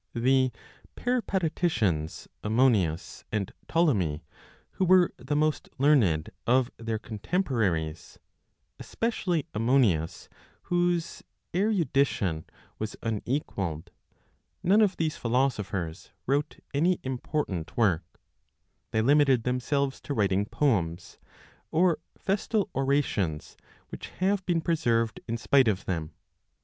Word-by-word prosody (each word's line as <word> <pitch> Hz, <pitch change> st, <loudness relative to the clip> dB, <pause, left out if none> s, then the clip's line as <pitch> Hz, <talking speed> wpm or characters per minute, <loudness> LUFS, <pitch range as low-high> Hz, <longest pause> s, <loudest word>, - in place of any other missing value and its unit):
The 130 Hz, +2 st, +3 dB, 0.4 s
Peripateticians 165 Hz, -, 0 dB, 0.2 s
Ammonius 105 Hz, -8 st, +1 dB
and 105 Hz, -3 st, -2 dB
Ptolemy, 100 Hz, -, +1 dB, 0.5 s
who 190 Hz, -, 0 dB
were 185 Hz, -1 st, +5 dB
the 130 Hz, +4 st, -3 dB
most 155 Hz, 0 st, 0 dB
learned 120 Hz, -, +3 dB, 0.2 s
of 125 Hz, +1 st, +3 dB
their 115 Hz, -1 st, -3 dB
contemporaries, 105 Hz, -, -2 dB, 0.6 s
especially 185 Hz, -9 st, -1 dB
Ammonius, 105 Hz, -, +1 dB, 0.4 s
whose 175 Hz, -1 st, 0 dB, 0.3 s
erudition 140 Hz, -, +1 dB, 0.3 s
was 110 Hz, 0 st, -4 dB
unequalled, 105 Hz, -, -3 dB, 0.7 s
none 200 Hz, +5 st, +5 dB
of 200 Hz, -3 st, +2 dB
these 160 Hz, -2 st, -1 dB
philosophers 105 Hz, -9 st, -1 dB, 0.2 s
wrote 140 Hz, +3 st, 0 dB
any 170 Hz, +5 st, +2 dB
important 130 Hz, -, -3 dB
work; 95 Hz, -8 st, +3 dB, 0.9 s
they 110 Hz, -, +1 dB
limited 135 Hz, -2 st, +4 dB
themselves 135 Hz, +2 st, -1 dB
to 145 Hz, -, -4 dB
writing 100 Hz, -1 st, +1 dB
poems, 90 Hz, -, -1 dB, 0.5 s
or 170 Hz, 0 st, +3 dB, 0.2 s
festal 205 Hz, +1 st, -1 dB
orations, 135 Hz, -, 0 dB, 0.3 s
which -, -, -7 dB
have 195 Hz, +1 st, +1 dB
been 170 Hz, -2 st, +2 dB
preserved 115 Hz, -9 st, +1 dB
in 115 Hz, -, -2 dB
spite 115 Hz, +4 st, +4 dB
of 105 Hz, -2 st, 0 dB
them. 80 Hz, -4 st, -3 dB
130 Hz, 100 wpm, -28 LUFS, 100-155 Hz, 0.9 s, were